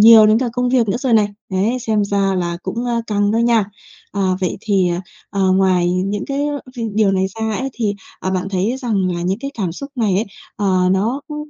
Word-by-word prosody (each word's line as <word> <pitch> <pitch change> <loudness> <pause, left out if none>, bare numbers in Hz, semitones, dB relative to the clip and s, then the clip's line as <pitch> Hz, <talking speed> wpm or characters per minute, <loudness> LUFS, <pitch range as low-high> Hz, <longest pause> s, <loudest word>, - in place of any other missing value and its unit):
nhiều 220 0 +9
đến 215 +1 +4
cả 250 -2 0
công 250 0 0
việc 245 -4 +2
nữa 195 - +1
rồi 255 -2 -1
này. 210 -2 +4 0.2
Đấy, 205 +7 +1
xem 215 -2 +1
ra 195 -1 +1
là 175 -1 -1
cũng, 235 +1 -3
ơ, 235 -1 0
căng 205 -1 +1
đó 225 - +1
nha. 235 -3 +3 0.5
À, 200 - -2 0.2
vậy 185 - -1
thì, 195 -5 +2 0.4
ờ, 190 -2 +2
ngoài 185 -2 +3
những 195 +3 -1
cái 280 +1 -1 0.5
điều 210 -2 +3
này 190 0 +1
ra 220 -1 -1
ấy, 265 +1 -2
thì, 215 -4 -1 0.3
ờ, 190 - -2
bạn 185 +1 -1
thấy 200 +6 0
rằng 215 -8 0
là 175 - -3
những 190 +4 -1
cái 275 +2 -5
cảm 180 -5 -1
xúc 280 +9 -8
này 220 -7 +1
ấy, 210 +4 +1 0.3
ờ, 185 -3 +2
nó, 220 +9 +1
ơ, 300 - -5
205 Hz, 225 wpm, -19 LUFS, 190-235 Hz, 0.5 s, nhiều